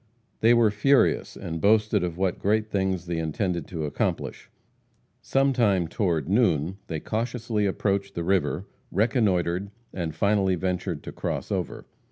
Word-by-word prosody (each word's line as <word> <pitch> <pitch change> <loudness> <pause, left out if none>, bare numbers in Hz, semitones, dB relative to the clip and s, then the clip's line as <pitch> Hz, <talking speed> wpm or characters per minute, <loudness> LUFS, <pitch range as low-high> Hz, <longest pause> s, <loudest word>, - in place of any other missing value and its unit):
They 115 +2 +5
were 115 -3 +4
furious, 130 +7 +2
and 85 -4 -5
boasted 105 -1 +3
of 85 -1 -3
what 95 -1 0
great 110 +2 +1
things 95 -3 0
they 85 -1 -2
intended 85 +1 -2
to 80 -4 -4
accomplish. 75 - -3 0.7
Sometime, 120 -10 +2
toward 85 -6 -1
noon, 95 - +2
they 80 -2 -3
cautiously 115 0 -1
approached 100 0 -1
the 85 - -2
river, 95 +1 0 0.3
reconnoitered, 100 -4 +1 0.2
and 85 -4 -3
finally 100 +1 +2
ventured 90 -3 -2
to - - -7
cross - - -4
over. - - -3
95 Hz, 140 wpm, -26 LUFS, 85-110 Hz, 0.7 s, They